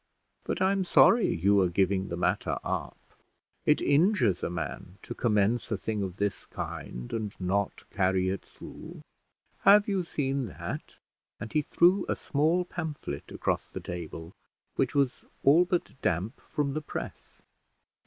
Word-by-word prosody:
But - - -1
I'm 195 0 +2
sorry 230 +5 +5
you 100 +4 +3
are 90 - +2
giving 95 +1 +1
the 85 - -4
matter 90 - 0
up. - - -3 0.7
It 150 - +4
injures 145 - +3
a - - -1
man 90 +2 -5
to - - -6
commence 105 +1 +1
a 110 - +1
thing 105 +1 -3
of 95 -2 -3
this 100 -1 -2
kind, - - -6
and 110 -3 -4
not 95 +2 -1
carry 95 0 +1
it 95 0 -2
through. - - -11 0.6
Have 205 +2 +6
you 195 -3 0
seen 135 -5 -2
that?" - - -7 0.4
and 110 - -7
he 155 - +3
threw 180 +5 +3
a - - +1
small 160 +5 +1
pamphlet 155 - -5
across - - -1
the - - -6
table, 85 -1 -7 0.4
which 130 +2 0
was 140 -3 +1 0.2
all 160 +6 +6
but 180 -1 -1
damp 90 +6 -1
from 140 -2 0
the 155 - -2
press. - - -8
110 Hz, 155 wpm, -29 LUFS, 95-155 Hz, 0.7 s, Have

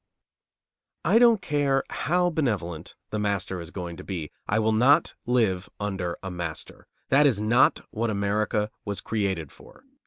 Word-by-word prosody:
I 230 - +5
don't 235 -3 +5
care 145 -2 +1
how 175 +3 +1
benevolent 100 - -2 0.2
the 105 - -2
master 100 -3 -1
is 85 - -9
going 85 -3 -6
to - - -9
be, 85 -6 -5 0.2
I 105 - +1
will 110 0 +2
not 135 +9 +4
live 105 -7 +1
under 95 -4 -3
a 95 - -4
master. 85 -3 -6 0.2
That 145 +2 +5
is 115 -7 +2
not 115 +4 +3
what 115 +2 -1
America 105 +1 0
was 100 -1 -3
created 95 -9 -2
for. - - -17
105 Hz, 155 wpm, -26 LUFS, 95-125 Hz, 0.2 s, I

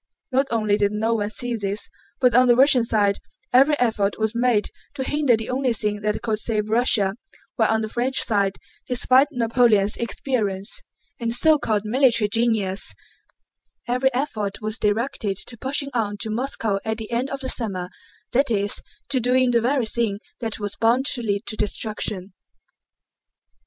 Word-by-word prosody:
Not 270 +2 +2
only 215 -3 +1
did 205 -1 +1
no 220 +2 0
one 205 -2 -1
see 235 +4 -1
this, 205 -1 -2 0.3
but 250 -2 +3
on 250 +1 +5
the 240 - +5
Russian 260 -1 +5
side 205 -3 +1 0.3
every 275 +4 +5
effort 220 -5 0
was 220 0 -1
made 235 -3 +1 0.2
to 265 - -3
hinder 285 -4 +2
the 225 +2 -5
only 255 -1 0
thing 210 -2 -1
that 210 +2 -2
could 220 -3 -1
save 215 -2 -2
Russia, 220 -4 +3 0.4
while - - +2
on 220 0 +1
the - - -2
French 245 +4 0
side, 200 -3 +1 0.3
despite 255 +2 +5
Napoleon's 230 -5 +3
experience 220 - -2 0.4
and 230 -1 -1
so 310 +4 +5
called 215 -5 -1
military 230 -2 +3
genius, 220 -4 0 0.9
every 250 +2 +1
effort 225 -7 -3
was 215 +1 -3
directed 210 -2 -1
to 235 - -8
pushing 275 +4 -2
on 210 -4 -1
to 220 - -3
Moscow 225 -4 -1
at 220 0 -2
the 220 0 -7
end 245 +3 -1
of 275 0 -5
the 260 - -4
summer, 195 -8 -2 0.4
that 275 +3 +2
is, 205 -2 0 0.3
to 270 -2 +2
doing 250 +1 +2
the 235 -1 +2
very 255 +1 +1
thing 220 -2 -1 0.2
that 225 -3 -4
was 205 -1 -4
bound 240 +4 +2
to 245 - -5
lead 205 -1 -2
to 215 - -2
destruction. 210 -2 -3
230 Hz, 170 wpm, -22 LUFS, 210-250 Hz, 0.9 s, on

